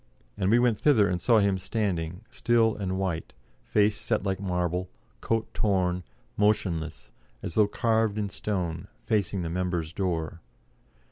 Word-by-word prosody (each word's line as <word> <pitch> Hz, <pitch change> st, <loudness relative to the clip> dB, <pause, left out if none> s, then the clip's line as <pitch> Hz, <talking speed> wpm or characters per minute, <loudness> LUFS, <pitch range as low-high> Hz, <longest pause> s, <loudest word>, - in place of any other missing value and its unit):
And 95 Hz, -, 0 dB
we 115 Hz, -, +5 dB
went 120 Hz, -3 st, +2 dB
thither 115 Hz, -9 st, +4 dB
and 90 Hz, -2 st, -1 dB
saw 115 Hz, -2 st, +4 dB
him 100 Hz, -2 st, +2 dB
standing, 95 Hz, -3 st, -2 dB
still 115 Hz, -2 st, +2 dB
and 95 Hz, -2 st, -2 dB
white, 90 Hz, -4 st, -2 dB, 0.3 s
face 105 Hz, 0 st, +2 dB
set 110 Hz, -4 st, -1 dB
like 95 Hz, -1 st, -1 dB
marble, 90 Hz, -1 st, -1 dB, 0.3 s
coat 115 Hz, -1 st, -1 dB
torn, 90 Hz, -3 st, +1 dB, 0.3 s
motionless, 90 Hz, -6 st, 0 dB, 0.3 s
as -, -, -4 dB
though 105 Hz, +2 st, +4 dB
carved 110 Hz, -1 st, +1 dB
in 105 Hz, -1 st, 0 dB
stone, 90 Hz, -5 st, -3 dB
facing 100 Hz, -3 st, -1 dB
the 80 Hz, -, -3 dB
members' 90 Hz, -2 st, -2 dB
door. 85 Hz, -3 st, -2 dB
95 Hz, 145 wpm, -27 LUFS, 90-105 Hz, 0.3 s, we